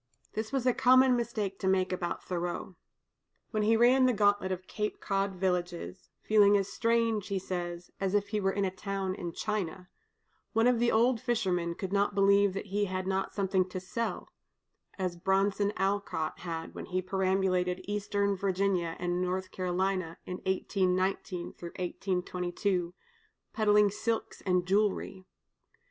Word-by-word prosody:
This 220 0 -3
was 270 -3 -1
a 250 - +4
common 255 +1 +5
mistake 220 -5 -2
to 190 - -2
make 185 -1 +2
about 175 -1 -3
Thoreau. 175 +1 -4 0.8
When 215 - 0
he 220 +2 +4
ran 255 +3 +5
the 250 - +3
gauntlet 205 -2 +2
of 185 -1 -2
the - - -33
Cape 210 0 -3
Cod 195 -1 -1
villages, 180 0 -2
"feeling 205 -1 +5
as 195 -1 -1
strange," 230 -3 +1
he 200 -2 -1
says, 175 -2 -4
"as 195 0 0
if 205 -1 +1
he 215 - 0
were 195 -1 +1
in 200 0 0
a 185 - -1
town 195 0 -3
in 175 -2 -5
China," 190 -2 -3 0.6
one 225 +1 +3
of 245 -1 +4
the 235 0 +3
old 235 +1 +3
fishermen 185 -9 0
could 190 +1 -5
not 200 0 +2
believe 200 0 +4
that 195 - -4
he 205 0 +2
had 185 -1 -3
not 190 0 -1
something 190 -2 +1
to 185 - -4
sell, 230 +5 -3 0.7
as 185 -2 -2
Bronson 195 +3 +1
Alcott 195 -5 -1
had 165 -2 -5
when - - -7
he 185 0 -1
perambulated 185 -1 +1
Eastern 205 -1 0
Virginia 190 -3 0
and 175 0 -1
North 185 +1 -2
Carolina 185 -1 -1
in 180 - -4
1819 185 -1 0 0.7
22, 180 0 -2 0.6
peddling 210 -2 +4
silks 220 +2 -3
and 180 -1 +2
jewelry. 195 -1 0
195 Hz, 155 wpm, -30 LUFS, 185-210 Hz, 0.8 s, common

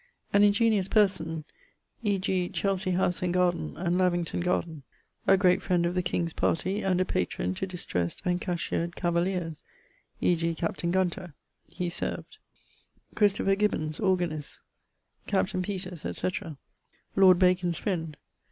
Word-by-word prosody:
An 200 - +5
ingeniose 205 -1 +3
person, 185 -7 +1 0.6
e.g. 190 -4 0
Chelsey 195 -1 -1
house 180 -1 +1
and 180 -1 0
garden, 175 - 0
and 175 +1 0
Lavington 175 -2 +1
garden. 170 -3 -1 0.5
A 195 - +6
great 180 -2 +3
friend 175 -2 +1
of 175 - 0
the 180 - +1
king's 170 -2 -1
partie 190 +5 0
and 185 -2 +1
a 185 - +2
patron 90 - -1
to 190 - -3
distressed 90 - -3
and 180 0 0
cashiered 170 -1 -2
cavaliers, 170 -2 -1 0.6
e.g. 165 -1 +1
captain 170 +1 -2
Gunter, 180 -3 -1 0.4
he 175 +1 -3
served; 170 - -4 0.7
Christopher 200 -2 +3
Gibbons 180 -7 0
(organist); 175 -7 -1 0.7
captain 95 - 0
Peters, 185 -3 -5
etc. 165 -5 -3 0.6
Lord 185 -2 +7
Bacon's 180 -2 +2
friend. 165 -7 -3
180 Hz, 130 wpm, -28 LUFS, 170-190 Hz, 0.7 s, Lord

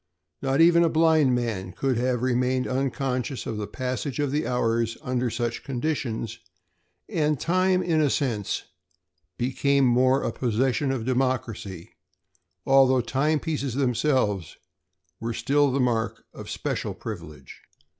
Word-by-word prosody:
Not 135 +3 +2
even 170 0 +6
a 165 - +3
blind 155 -5 +4
man 105 -7 -3
could 135 +4 0
have 125 0 0
remained 125 0 +1
unconscious 130 -1 -2
of 110 - -4
the 105 -1 -4
passage 130 +1 -3
of 145 -2 0
the 150 +2 -1
hours 115 -2 0
under 125 -1 -1
such 120 0 -3
conditions, 120 -5 -3 0.7
and 150 -3 0
time, 185 +1 +2
in 160 -3 +2
a 150 - +3
sense, 115 -8 -1 0.7
became 135 +2 +2
more 130 +2 +3
a - - -1
possession 130 +5 0
of 125 -4 -3
democracy 125 -8 -2 0.7
although 135 -1 +5
timepieces 140 +2 -1
themselves 125 - 0 0.6
were 115 0 -3
still 140 +5 +2
the 135 - 0
mark 120 -3 0
of - - -9
special - - -3
privilege. - - -9
130 Hz, 130 wpm, -25 LUFS, 120-140 Hz, 0.7 s, even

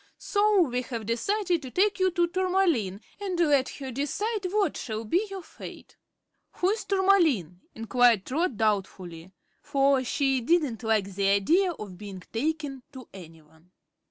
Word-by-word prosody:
So 415 -2 +2
we 250 -6 0
have 235 -3 -6
decided 350 - 0
to 265 - -8
take 395 +8 +1
you 375 0 +3
to 350 -1 +1
Tourmaline 345 - 0 0.2
and 380 -4 -3
let 290 -6 +3
her 270 -2 -7
decide 380 - -2
what 410 -1 +1
shall 220 -2 -5
be 360 - +1
your 385 -2 -7
fate." - - -12 0.6
"Who 365 - 0
is 440 - -3
Tourmaline?" 335 - +2 0.2
inquired 225 -2 +3
Trot, 290 - -1
doubtfully, 190 -5 -2 0.3
for 275 -1 +2
she 270 0 0
didn't 280 -4 +1
like 215 -4 0
the 195 +1 0
idea 335 - +3
of 200 - -9
being 195 -3 -8
"taken" 290 +1 -2
to 260 -2 -11
anyone. 160 -2 -15
270 Hz, 150 wpm, -27 LUFS, -, 0.6 s, you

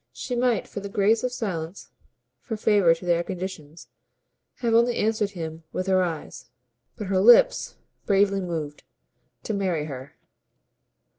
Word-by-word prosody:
She 250 - -4
might 240 -4 +1
for - - -6
the 200 0 -7
grace 210 +3 +2
of 250 - -1
silence, 185 -7 -5 0.5
for 225 -3 -5
favour 200 -6 +4
to 170 - -11
their 170 -1 +2
conditions, 175 -4 -7 0.7
have 235 -2 -1
only 235 +1 +3
answered 215 -1 +1
him 160 -1 -6
with 185 - -3
her 190 -1 +3
eyes. 165 -8 -5 0.5
But 215 - -6
her 190 0 +1
lips 240 - +5 0.3
bravely 195 -1 +3
moved. 160 -5 -5 0.6
"To - - -3
marry 185 -7 -1
her." 135 -1 -8
195 Hz, 145 wpm, -25 LUFS, 165-220 Hz, 0.7 s, lips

